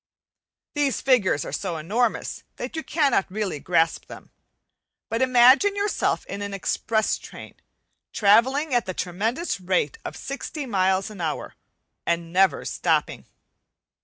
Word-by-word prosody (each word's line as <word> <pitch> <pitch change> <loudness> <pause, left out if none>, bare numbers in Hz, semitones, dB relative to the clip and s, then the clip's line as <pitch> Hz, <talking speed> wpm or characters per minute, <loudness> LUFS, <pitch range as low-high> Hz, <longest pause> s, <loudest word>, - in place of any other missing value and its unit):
These 290 -3 0
figures 215 - +2
are - - -6
so 180 -4 -3
enormous 215 +9 -1
that - - -6
you 320 - -2
cannot 285 - +1
really 195 -5 -3
grasp 165 +1 +1
them. - - -12 0.8
But 230 +2 -1
imagine 260 +10 +5
yourself 405 +1 0
in 200 - -6
an 200 -1 -4
express 220 +2 0
train, - - -11 0.6
travelling 255 +8 +3
at 240 -5 +1
the 185 - -4
tremendous 220 - -2
rate 180 -5 0
of 160 - -6
sixty 280 - -5
miles 190 -2 +1
an 200 -4 -9
hour 160 -2 -3 0.5
and 170 0 -2
never 190 -4 +3
stopping. - - -1
210 Hz, 135 wpm, -24 LUFS, 185-260 Hz, 0.8 s, imagine